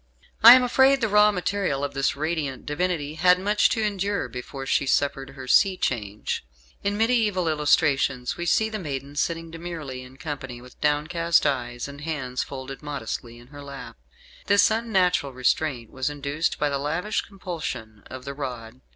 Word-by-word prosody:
I 235 +2 +12
am 255 - +4
afraid 265 +2 +4
the 230 - +1
raw 210 0 +5
material 180 -6 -1
of 140 0 -2
this 135 -1 0
radiant 150 -3 -3
divinity 155 -1 -2
had 180 +3 +4
much 205 +2 +3
to 220 - 0
endure 200 -5 -1
before 125 +3 -7
she 135 - +1
suffered 135 -1 0
her 130 -2 -9
sea 190 +7 +4
change. 105 - -2 0.4
In 205 +1 0
mediaeval 220 -6 +2
illustrations 145 -4 +2
we 175 - -4
see 220 +6 +3
the 220 -1 -4
maiden 140 -4 -5
sitting 165 +2 -2
demurely 165 -6 -6
in 130 +1 -13
company, 130 -3 -6
with 125 +1 -16
downcast 160 +3 +2
eyes, 120 -3 -1
and 140 +1 -10
hands 140 -5 -3
folded 135 0 -7
modestly 125 -5 -5
in 120 +1 -16
her 145 0 -11
lap. 140 -1 -9 0.5
This 205 +1 +5
unnatural 190 - +1
restraint 125 -1 0
was 130 +2 -2
induced 145 +2 -2
by 150 - +1
the 140 -1 -1
lavish 165 +9 -1
compulsion 160 - -6
of 130 0 -9
the 140 - -5
rod. 125 -3 -7
150 Hz, 170 wpm, -25 LUFS, 130-180 Hz, 0.5 s, I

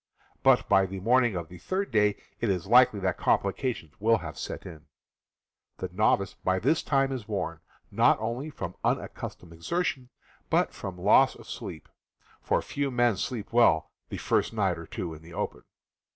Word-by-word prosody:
But - - +4
by 95 0 +4
the 95 +1 -6
morning 120 +1 +3
of 85 -2 -4
the 90 +2 -12
third 195 - -2
day 105 -2 +3 0.2
it 115 - 0
is 90 -4 0
likely 125 -4 +5
that 95 -2 -1
complications 100 - 0
will 115 +2 +4
have 80 -6 -7
set - - -6
in. 80 -2 -11 0.9
The 95 - -4
novice 100 -1 +2
by 95 0 -1
this 155 - +2
time 135 -1 +1
is 125 -6 -5
worn, 90 -6 -3 0.3
not - - +4
only 120 +7 -3
from 150 - -6
unaccustomed 85 -2 -3
exertion, 130 - -2 0.4
but - - +2
from 95 -2 -7
loss 105 +8 +5
of - - -14
sleep 80 - -7 0.3
— - - -32
for - - 0
few 140 -1 -2
men 120 -3 +2
sleep 115 +1 -4
well 115 -10 +4 0.2
the - - -5
first - - 0
night - - 0
or - - -9
two 85 -3 -5
in 80 - -11
the 85 +1 -12
open. - - -4
105 Hz, 180 wpm, -28 LUFS, 90-125 Hz, 0.9 s, likely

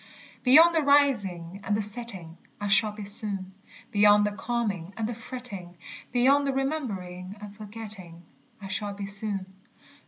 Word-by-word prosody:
Beyond 320 +7 +7
the 325 - +3
rising 200 - +2
and 205 - 0
the - - 0
setting 200 -6 -3 0.2
I 205 - -4
shall 215 +1 +4
be 210 0 -8
soon; 200 -2 -3 0.4
Beyond 205 0 +6
the 210 - 0
calming 205 -5 -3
and 220 -1 -1
the 240 - -3
fretting, 225 -7 -8 0.3
Beyond 275 +4 +4
remembering 200 -10 -3
and 205 -1 -10
forgetting, 205 -5 -4 0.4
I 195 - -8
shall 200 +1 -3
be 200 0 -5
soon. 200 -1 -3
210 Hz, 145 wpm, -27 LUFS, 195-240 Hz, 0.4 s, Beyond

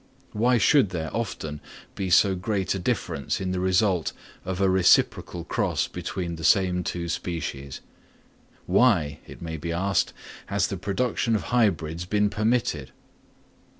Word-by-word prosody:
Why 120 +3 +2
should 125 - +4
there 80 -3 -4
often 80 -10 -4 0.3
be 95 -1 -3
so 95 +2 +5
great 95 0 -1
a 95 - -3
difference 90 - -2
in 95 -1 -2
the 90 - -1
result 95 -1 +1 0.3
of 95 0 -3
a 100 - +3
reciprocal 95 -1 +3
cross - - -1
between 90 -1 -4
the 80 - -8
same 90 +1 +3
two 85 -1 -3
species? 80 -5 -4 0.8
Why, 90 - +3
it - - -11
may 80 - -5
even 80 - -5
be 85 - -3
asked, 95 +4 +1 0.4
has 100 -2 +1
the 95 - -3
production 115 +4 0
of 105 - -1
hybrids 85 -8 +1
been 105 +2 +1
permitted? 105 - 0
95 Hz, 150 wpm, -25 LUFS, 85-105 Hz, 0.8 s, so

